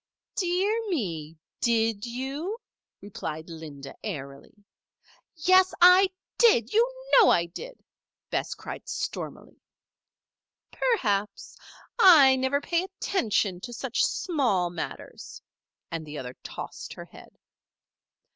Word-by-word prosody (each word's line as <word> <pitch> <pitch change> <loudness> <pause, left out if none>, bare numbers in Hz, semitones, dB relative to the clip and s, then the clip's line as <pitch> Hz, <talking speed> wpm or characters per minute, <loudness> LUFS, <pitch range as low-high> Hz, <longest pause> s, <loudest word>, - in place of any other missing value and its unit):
"Dear 400 +5 0
me! 165 - -3 0.2
did 225 -2 +1
you?" 275 - -4 0.4
responded 165 -5 -7
Linda, 150 -4 -9
airily. 140 +2 -8 0.7
"Yes, 370 +3 +4
I 365 +2 +7 0.3
did! 265 - +4
You 470 +3 +3 0.2
know 475 -5 +8
I 170 - +3
did!" - - -10 0.5
Bess - - -2
cried - - -9
stormily. - - -6 1.1
"Perhaps. 210 - -1 0.4
I 300 - +8
never 260 +2 0
pay 340 +5 -1
attention 220 - -1
to 240 - -7
such 235 - -1
small 235 - 0
matters," 175 - -7 0.5
and 165 -1 -4
the 150 -1 -8
other 125 -2 -6
tossed - - -8
her - - -9
head. - - -16
245 Hz, 105 wpm, -27 LUFS, -, 1.1 s, know